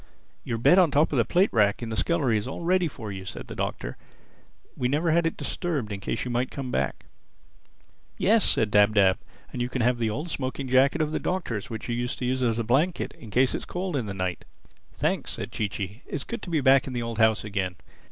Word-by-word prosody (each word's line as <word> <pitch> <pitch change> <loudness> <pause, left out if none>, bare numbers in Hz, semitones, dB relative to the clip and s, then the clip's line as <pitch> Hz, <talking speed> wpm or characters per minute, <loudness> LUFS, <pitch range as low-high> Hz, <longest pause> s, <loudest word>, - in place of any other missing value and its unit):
"Your 115 - -2
bed 175 +11 +5
on 180 -3 +5
top 145 +2 +3
of 135 - +2
the 115 - +3
plate 185 +3 +2
rack 105 +1 +3
in 115 - -4
the 110 - -3
scullery 140 -3 +1
is 105 +2 -1
all 135 - -5
ready 180 0 +2
for 115 -8 -7
you," 95 -1 -6
said 95 - -7
the - - -8
Doctor. - - -4 0.8
"We 125 - 0
never 155 +5 +1
had 170 +1 +3
it 165 - -4
disturbed 145 - -2
in 100 - -4
case - - -3
you 125 - -3
might 125 +2 0
come 135 -3 -5
back." - - -2 1.1
"Yes," 220 +1 +4
said 110 -2 +2
Dab 105 +1 +5
Dab, 95 -2 +4 0.3
"and 125 - -3
you 120 - -1
can 130 -2 -1
have 120 0 +2
the 115 -2 +1
old 150 +10 -4
smoking 130 0 -3
jacket 135 +5 +4
of 150 - -2
the - - -1
Doctor's 125 - -3
which 110 -2 -6
you 120 - -1
used 120 +1 -2
to 125 - -3
use 130 +1 0
as 115 -3 +1
a 115 - 0
blanket, 145 +10 +1
in 115 - -12
case 125 +4 +3
it - - 0
is - - -9
cold 180 -2 -3
in 125 -6 -1
the 100 - -5
night." 90 -3 -3 0.5
"Thanks," - - -1
said - - -5
Chee 105 - -1
Chee. 100 +4 -6
"It's 145 - -4
good 235 -2 -6
to - - -7
be 160 -3 +1
back 135 0 +5
in 130 - -5
the 120 -1 -2
old 115 -1 -4
house 110 -1 +4
again. 100 -4 -2
125 Hz, 250 wpm, -26 LUFS, 110-150 Hz, 1.1 s, bed